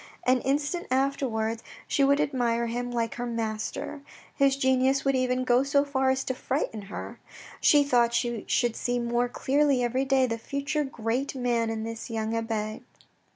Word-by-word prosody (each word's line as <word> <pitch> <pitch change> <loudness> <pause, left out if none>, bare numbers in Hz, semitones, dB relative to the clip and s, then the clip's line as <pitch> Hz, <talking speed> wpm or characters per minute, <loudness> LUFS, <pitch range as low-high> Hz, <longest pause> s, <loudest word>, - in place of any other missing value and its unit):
An 255 0 +3
instant 290 +6 -1
after 270 +1 +1
wards 220 0 -2 0.3
she 280 - +2
would 280 +1 +4
admire 235 -4 +1
him 245 +1 -3
like 235 -2 -1
her 245 - -2
master. 225 +4 -4 0.3
His 275 -1 +3
genius 260 0 +2
would 275 0 +3
even 255 0 +1
go 250 0 +4
so 280 +1 +2
far 265 -2 +1
as 265 0 +1
to 260 - -2
frighten 255 -4 -2
her. - - -7 0.4
She 290 -1 +5
thought 240 -4 +3
she 235 -3 -1
should 240 -3 +1
see 245 0 -1
more 240 0 0
clearly 275 0 +2
every 255 +3 0
day 270 -1 +3
the 230 -2 -3
future 280 +5 -2
great 255 +1 -2
man 240 -3 0
in 220 -1 -3
this 230 +2 -6
young 225 0 -2
abbe. 220 -1 -3
250 Hz, 175 wpm, -27 LUFS, 230-275 Hz, 0.4 s, She